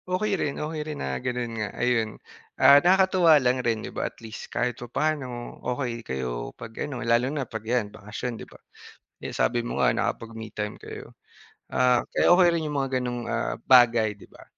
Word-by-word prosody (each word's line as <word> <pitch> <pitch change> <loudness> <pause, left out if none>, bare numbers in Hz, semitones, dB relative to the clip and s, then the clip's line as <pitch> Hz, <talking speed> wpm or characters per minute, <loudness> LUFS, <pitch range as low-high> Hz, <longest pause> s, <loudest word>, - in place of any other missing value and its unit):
Okey 200 +3 0
rin, 150 -7 -1
okey 155 0 -3
rin 150 -1 -5
na 65 - -3
gano'n 125 -2 -3
nga, 105 - -2
ayun, 120 -3 0 0.4
ah, 140 +2 +8
nakakatuwa 185 -2 +5
lang 125 -2 +1
rin, 115 -3 -1
'di - - -8
ba, - - -2
at - - -30
least, 110 -1 -9
kahit 125 0 -1
papa'no 125 -1 -3
okey 125 -2 -3
kayo. 65 - -4
'Pag 115 +5 -6
ano, 125 -4 -5
lalo 120 +2 +3
na 140 -2 -2
'pag 110 -1 -6
yan, 110 -2 -1
'pag 100 -1 -13
bakasyon, 120 +3 -4
'di - - -10
ba? - - -15 0.6
Eh, - - -6
sabi 120 - +1
mo - - -1
nga, - - +5
nakapag-me 115 -1 -3
time 105 0 -4
kayo, - - -9 0.6
ah, 125 -1 +3
kaya - - +3
okey 180 -1 +6
rin 170 - 0
'yong 150 - -3
mga 135 -1 -1
gano'ng, 120 -1 -3
ah, - - -2
bagay, 120 -4 +5
'di 100 - -16
ba, - - -16
125 Hz, 200 wpm, -26 LUFS, 115-145 Hz, 0.6 s, ah